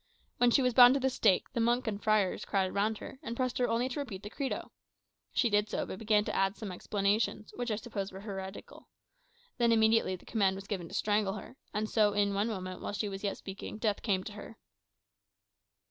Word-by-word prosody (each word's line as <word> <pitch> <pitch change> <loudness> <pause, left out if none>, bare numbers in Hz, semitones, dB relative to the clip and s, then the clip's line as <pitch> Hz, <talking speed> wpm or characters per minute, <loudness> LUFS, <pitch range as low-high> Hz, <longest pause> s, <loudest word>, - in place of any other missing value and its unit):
When 245 - +5
she 265 +3 +4
was 250 -1 +2
bound 245 +1 +9
to - - +2
the 265 0 +1
stake, 190 -6 +2
the - - -1
monks 240 +2 +2
and 205 -1 -2
friars 215 -3 +2
crowded 190 -2 0
round 210 +2 +1
her, 265 - -9
and 230 - -5
pressed 255 -1 -1
her 245 - +3
only 235 +2 +1
to 260 - -4
repeat 215 -9 -5
the 210 - -7
Credo. 275 +1 -3 0.6
She 240 - +2
did 210 -1 +2
so; - - -2
but 185 - -7
began 210 -1 +2
to - - -3
add 195 +1 +2
some 210 -4 -6
explanations, 205 +3 -1
which, 245 0 -3
I 215 - +1
suppose, 205 -3 -5
were 190 +1 -9
heretical. 195 -2 -8 0.7
Then 235 -1 +4
immediately 220 -3 +3
the 180 - -15
command 195 -4 +1
was 195 0 -8
given 190 -5 -4
to - - -8
strangle 205 -2 +1
her; 215 - -9 0.2
and 215 +1 -1
so, 210 -2 +3
in 200 0 +2
one 200 +3 +1
moment, 185 -4 -5
while - - -4
she 205 0 -2
was 195 0 -7
yet 200 - -1
speaking, 195 +2 -7
death 215 -2 0
came 190 -4 0
to 210 - -7
her." 210 +2 -10
210 Hz, 225 wpm, -31 LUFS, 195-230 Hz, 0.7 s, bound